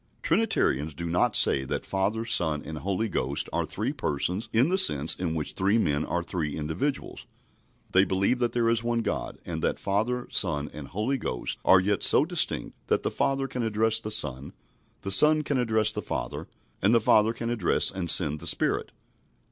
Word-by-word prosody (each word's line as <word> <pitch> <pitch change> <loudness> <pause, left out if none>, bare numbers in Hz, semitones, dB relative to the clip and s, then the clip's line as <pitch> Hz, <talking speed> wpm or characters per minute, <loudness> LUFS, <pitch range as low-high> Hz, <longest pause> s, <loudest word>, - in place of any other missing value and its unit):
Trinitarians 80 - 0
do 85 - -6
not 85 +1 0
say 65 - +3
that 65 - -5
Father, 100 +4 -2
Son, 80 -10 +1
and 80 0 -7
Holy 100 +5 -2
Ghost 70 -6 -1
are - - -1
three - - -3
Persons 90 +10 -3
in 120 +7 +2
the 190 - +1
sense 75 - +4
in 85 -3 -3
which 75 -2 -4
three 100 +4 +1
men 75 -8 0
are 85 0 -3
three 80 -4 -4
individuals. 80 - -4 0.6
They 95 - +4
believe 100 +6 0
that 120 -2 0
there 120 -1 0
is 115 0 +1
one 120 0 -1
God, - - -4
and 80 -2 -5
that - - -1
Father, 115 +5 -2
Son, 75 -6 +1
and 75 -2 -9
Holy 120 +7 -2
Ghost 60 - -4
are 95 - +6
yet 100 +1 -1
so - - +5
distinct - - +1
that - - 0
the - - -2
Father 135 0 -1
can 125 - -5
address 110 0 +1
the 110 - -6
Son, 70 -8 0 0.5
the 95 - -5
Son 150 +10 +7
can 140 -2 -1
address 110 -3 +2
the - - -4
Father, - - -5 0.3
and 105 +5 +3
the - - +5
Father 110 0 +3
can 115 0 -5
address 110 -7 +2
and 90 -3 -5
send 75 -3 +3
the - - -6
Spirit. - - 0
100 Hz, 195 wpm, -26 LUFS, 80-115 Hz, 0.6 s, Son